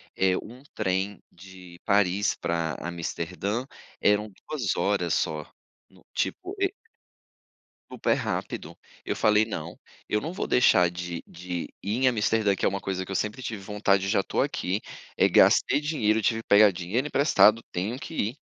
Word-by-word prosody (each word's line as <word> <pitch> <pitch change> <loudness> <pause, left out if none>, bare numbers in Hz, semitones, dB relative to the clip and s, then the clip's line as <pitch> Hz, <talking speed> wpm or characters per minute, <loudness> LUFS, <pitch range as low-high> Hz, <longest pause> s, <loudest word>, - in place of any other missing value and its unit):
eh, 95 -1 +2
um 125 +4 -10
trem 95 0 -1
de 90 -1 -14
Paris 100 0 +2
pra 85 -1 -2
Amsterdã, 85 +6 -3 0.4
eram 105 0 +2 0.2
2 150 -5 -1
horas 95 -5 0
só, 75 -1 -1 0.4
no - - -22
tipo, 375 +1 -3
e 390 0 +1 1.2
Super - - +1
rápido, - - -4 0.3
eu - - -2
falei 105 0 +4
"não, 110 - -6 0.3
eu 105 - +2
não 160 - -5
vou - - -3
deixar 90 -8 +5
de 85 -1 -6
de 90 0 -5 0.2
ir 105 +4 -1
em - - +6
Amsterdã 110 -3 +2
que - - -2
é - - +5
uma 100 0 -4
coisa 95 -1 -3
que 100 - -9
eu - - -3
sempre 105 +6 -2
tive 110 -4 -5
vontade 100 -1 +1
e - - -2
já 100 -1 +3
estou - - -1
aqui, 95 +4 -1 0.4
eh, - - +5
gastei 140 - +5
dinheiro, 110 -8 +1
tive 115 +1 +1
que - - -27
pegar 105 0 +7
dinheiro 95 +9 -2
emprestado, 115 -7 +4
tenho 105 +8 -3
que 165 - -8
ir 115 +3 -1
100 Hz, 170 wpm, -26 LUFS, 90-110 Hz, 1.2 s, pegar